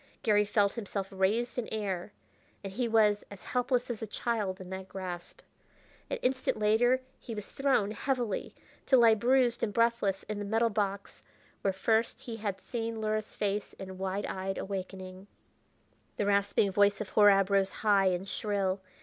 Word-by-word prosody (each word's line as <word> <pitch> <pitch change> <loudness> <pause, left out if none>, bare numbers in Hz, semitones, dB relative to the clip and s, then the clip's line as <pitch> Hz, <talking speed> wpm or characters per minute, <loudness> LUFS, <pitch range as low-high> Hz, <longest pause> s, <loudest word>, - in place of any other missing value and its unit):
Garry 210 -2 +4
felt 205 -1 +2
himself 200 -4 -4
raised 210 +6 0
in 235 - -3
air, 200 -3 -3 0.5
and 195 -1 -6
he 245 +3 0
was 215 -2 +3
as 200 -2 -11
helpless 250 0 0
as 240 -3 -4
a 225 - -3
child 210 -3 -2
in 185 - -9
that 190 0 -6
grasp. 180 -2 -7 0.7
An - - -1
instant 260 -1 0
later 230 +5 +3 0.2
he 230 - -7
was 210 -1 -5
thrown 265 -7 +1
heavily, 240 -2 -2 0.3
to 265 - +6
lie 230 -2 +7
bruised 245 +2 +2
and 215 - 0
breathless 230 -3 +1
in 210 -1 -5
the - - -3
metal 225 +3 +1
box 200 -1 -2 0.4
where 195 - +2
first 220 +4 0
he 230 -2 -6
had 205 -3 -3
seen 230 +1 -4
Luhra's 215 0 -2
face 205 0 -2
in 190 -1 -9
wide 190 +1 -2
eyed 190 0 -3
awakening. 190 0 -6 0.9
The 205 - 0
rasping 200 0 +2
voice 200 +1 +3
of 210 - -4
Horab 200 -2 +5
rose 195 -1 +3
high 200 -3 +3
and 185 +1 0
shrill. 195 0 -1
205 Hz, 165 wpm, -30 LUFS, 195-230 Hz, 0.9 s, lie